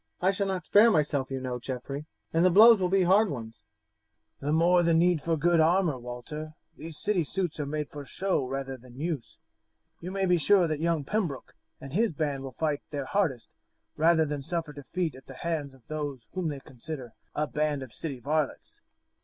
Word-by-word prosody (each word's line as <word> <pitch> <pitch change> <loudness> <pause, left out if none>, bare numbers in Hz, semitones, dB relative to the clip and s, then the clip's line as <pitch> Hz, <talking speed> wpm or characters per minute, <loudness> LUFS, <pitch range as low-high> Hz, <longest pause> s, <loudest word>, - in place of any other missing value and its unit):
"I 185 +2 +3
shall 200 0 -1
not 190 -2 -2
spare 215 +3 +6
myself, 145 -7 +1
you 135 -1 -3
know, 125 -1 -4
Geoffrey, 135 +4 -5 0.3
and 165 +1 +3
the 185 - +6
blows 215 +3 +8
will 180 - +2
be 190 0 +3
hard 195 +4 +4
ones. 115 - -6 0.8
"The 145 - -2
more 175 +3 +4
need 170 -1 +3
for 165 +1 0
good 170 +2 +3
armour, 165 -3 +3
Walter. 125 +6 -7 0.2
These 160 0 -8
city 205 -5 +1
suits 175 +1 -3
are 145 - -2
made 150 0 -3
for 145 -1 -7
show 180 +1 -1
rather 135 0 -4
than 125 +1 -14
use. 145 -9 -4 0.6
You 175 - -6
may 195 0 0
be 180 -1 +4
sure 185 +1 +5
that 155 -2 -2
young 165 -2 +1
Pembroke 165 - -2 0.3
and 135 0 -9
his 215 0 +2
band 145 -3 -2
will 135 -1 -7
fight 150 -3 0
their 140 -2 -4
hardest 135 - -1 0.4
rather 160 0 +4
than 145 -1 -3
suffer 165 +1 -3
defeat 160 +4 -3
at 130 +1 -14
the 135 - -10
hands 150 -3 -3
of 125 -4 -23
those 145 -4 -4
whom 185 -3 -2
they 145 -3 -4
consider 130 -1 -8 0.2
a 150 - +1
band 150 -2 -1
of 125 -4 -11
city 140 -2 -5
varlets." 150 +3 -2
155 Hz, 195 wpm, -28 LUFS, 135-175 Hz, 0.8 s, blows